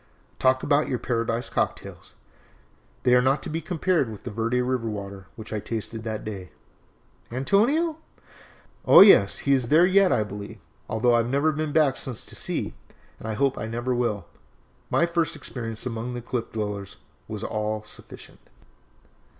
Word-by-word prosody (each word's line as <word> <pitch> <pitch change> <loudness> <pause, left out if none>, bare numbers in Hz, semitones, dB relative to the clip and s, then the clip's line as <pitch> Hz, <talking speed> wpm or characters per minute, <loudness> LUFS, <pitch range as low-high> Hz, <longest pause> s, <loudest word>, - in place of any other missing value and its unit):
Talk 130 0 +3
about 145 +1 +2
your 125 - -1
Paradise 115 -1 -2
Cocktails - - -3 0.9
they 125 - +4
are 125 - +6
not 135 +2 +1
to - - -4
be 165 +1 -2
compared 165 -5 0
with 105 - -10
that - - -5
Verde 115 +3 0
River 125 -2 -1
water 100 -2 -7
which 110 -1 -8
I 105 - -1
tasted 110 +1 -5
that 110 -2 -4
day!" 95 -4 -6 0.8
"Antonio?" 240 - +2 0.9
"Oh, - - +9
yes, 145 - +7
he 140 - +4
is 130 -3 +1
there 160 +7 +6
yet, 190 0 +4
I 110 - +2
believe, 100 0 -8 0.3
although 120 +2 +2
I - - +5
have 115 0 0
never 140 +4 +2
been 155 0 -3
back 145 -3 +3
since 125 -4 -4
to - - -10
see, - - -2 0.5
and - - -8
I 110 - -2
hope 135 +2 +1
I - - -4
never 120 +3 -2
will. 115 -5 -1 0.6
My 170 - +3
first 170 -1 0
experience 115 -2 -6
among 120 0 -4
the 120 - -5
Cliff 120 -1 -4
Dwellers 105 -3 -4 0.3
was - - -6
all 110 0 -2
sufficient." 105 - -12
120 Hz, 170 wpm, -25 LUFS, 110-140 Hz, 0.9 s, Oh